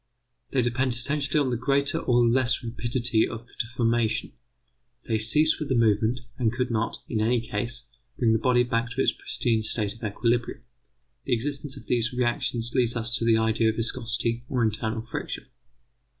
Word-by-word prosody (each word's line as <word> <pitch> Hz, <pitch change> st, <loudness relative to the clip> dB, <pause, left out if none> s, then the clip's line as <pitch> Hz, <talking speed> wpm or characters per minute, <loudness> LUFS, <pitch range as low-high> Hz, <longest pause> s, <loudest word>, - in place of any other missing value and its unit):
They 130 Hz, -3 st, +1 dB
depend 125 Hz, +1 st, +1 dB
essentially 140 Hz, +4 st, +1 dB
on 135 Hz, -3 st, +1 dB
the 120 Hz, -, 0 dB
greater 140 Hz, +3 st, +1 dB
or 120 Hz, -1 st, +3 dB
less 125 Hz, +1 st, +2 dB
rapidity 120 Hz, 0 st, +1 dB
of 115 Hz, 0 st, -8 dB
the -, -, -19 dB
deformation, 115 Hz, -1 st, 0 dB, 0.7 s
they 110 Hz, -2 st, 0 dB
cease 150 Hz, +9 st, +4 dB
with 150 Hz, -, -4 dB
the 130 Hz, -, +1 dB
movement, 115 Hz, +1 st, +2 dB, 0.2 s
and 115 Hz, -3 st, +2 dB
could 125 Hz, +1 st, -2 dB
not, 115 Hz, 0 st, -2 dB
in 110 Hz, -, -1 dB
any 120 Hz, +3 st, +2 dB
case, 115 Hz, +2 st, -3 dB, 0.3 s
bring 115 Hz, -3 st, +3 dB
the 110 Hz, -, +2 dB
body 125 Hz, 0 st, +3 dB
back 120 Hz, -1 st, -1 dB
to 125 Hz, +2 st, -2 dB
its -, -, +3 dB
pristine 115 Hz, -3 st, -1 dB
state 110 Hz, -1 st, +1 dB
of 115 Hz, -, -18 dB
equilibrium. 120 Hz, +4 st, -1 dB, 0.6 s
The 130 Hz, -, 0 dB
existence 140 Hz, +3 st, -2 dB
of -, -, -11 dB
these 120 Hz, 0 st, +1 dB
reactions 120 Hz, -1 st, -1 dB
leads 120 Hz, -3 st, +1 dB
us 115 Hz, 0 st, 0 dB
to 115 Hz, -, -2 dB
the 115 Hz, -1 st, +4 dB
idea 110 Hz, 0 st, +2 dB
of 110 Hz, -, -2 dB
viscosity 115 Hz, 0 st, -1 dB
or 125 Hz, -3 st, 0 dB
internal 110 Hz, +1 st, -1 dB
friction. 115 Hz, -, -5 dB
120 Hz, 180 wpm, -26 LUFS, 115-125 Hz, 0.7 s, cease